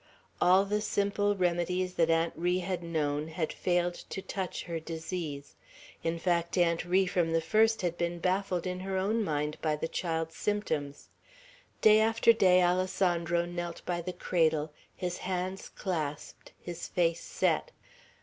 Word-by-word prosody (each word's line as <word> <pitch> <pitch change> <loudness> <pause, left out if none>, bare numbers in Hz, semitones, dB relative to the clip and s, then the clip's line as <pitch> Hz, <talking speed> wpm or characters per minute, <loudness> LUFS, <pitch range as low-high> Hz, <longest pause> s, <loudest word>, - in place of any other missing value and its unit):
All 185 +2 +5
the 210 +1 0
simple 205 0 +1
remedies 180 0 0
that 165 -2 +2
Aunt 165 0 +2
Ri 175 +2 +1
had 185 -1 -2
known, 155 -3 -1
had 160 0 -3
failed 175 -1 +1 0.2
to - - -4
touch 190 -1 -4
her 170 -2 -4
disease; 160 -3 -5 0.5
in 165 0 -1
fact, 170 0 0
Aunt 170 -2 +2
Ri 185 +2 +3
from 175 -3 0
the 165 - +4
first 220 +6 +2
had 175 -1 -1
been 170 0 -1
baffled 185 0 0
in 180 0 -3
her 190 0 -3
own 215 +4 +1
mind 150 -3 -2
by 155 -1 +1
the 150 - -3
child's 165 -1 -2
symptoms. 155 -9 -2 0.7
Day 215 0 +7
after 225 +1 +5
day 185 -4 +5
Alessandro 175 -1 +1
knelt 175 -1 -5
by 175 -1 -1
the 180 +2 -4
cradle, 160 -4 +1 0.2
his 180 -1 -3
hands 185 +1 -3
clasped, 155 -6 -4
his 175 -1 -6
face 170 -1 +1
set. - - 0
175 Hz, 155 wpm, -30 LUFS, 165-185 Hz, 0.7 s, Day